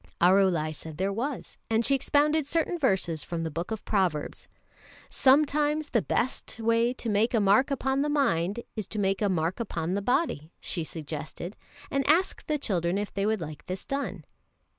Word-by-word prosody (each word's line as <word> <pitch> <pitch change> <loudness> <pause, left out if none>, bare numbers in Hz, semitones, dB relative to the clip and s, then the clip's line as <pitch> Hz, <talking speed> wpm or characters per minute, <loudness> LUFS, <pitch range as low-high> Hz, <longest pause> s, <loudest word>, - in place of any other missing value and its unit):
Arulai 180 -4 +4
said 155 0 -9
there 195 +2 0
was, 255 +5 -4
and 225 +1 +2
she 275 - +4
expounded 295 +2 +2
certain 335 +3 0
verses 190 - +1
from 170 -1 -4
the 160 - -3
Book 170 +4 -4
of 220 -2 -5
Proverbs. 180 -8 -1 0.6
"Sometimes 295 +2 +3
the 230 - +3
best 240 0 -2
way 230 +1 +2
to 245 - -6
make 220 +3 +2
a - - +4
mark 205 +7 +4
upon 270 0 0
the 295 - 0
mind 235 - +1
is 215 -4 -4
to 215 - -7
make 195 -1 +1
a 205 - +2
mark 170 +1 0
upon 175 -6 -2
the 200 - 0
body," 200 - 0
she 170 - -2
suggested, 160 +4 -6 0.4
and 275 0 +1
asked 350 +5 +2
the 305 - +1
children 180 - -1
if 205 0 -3
they 200 +1 0
would 220 -3 0
like 155 -2 -8
this 185 +1 -4
done. 260 - -3
210 Hz, 185 wpm, -28 LUFS, 175-270 Hz, 0.6 s, Arulai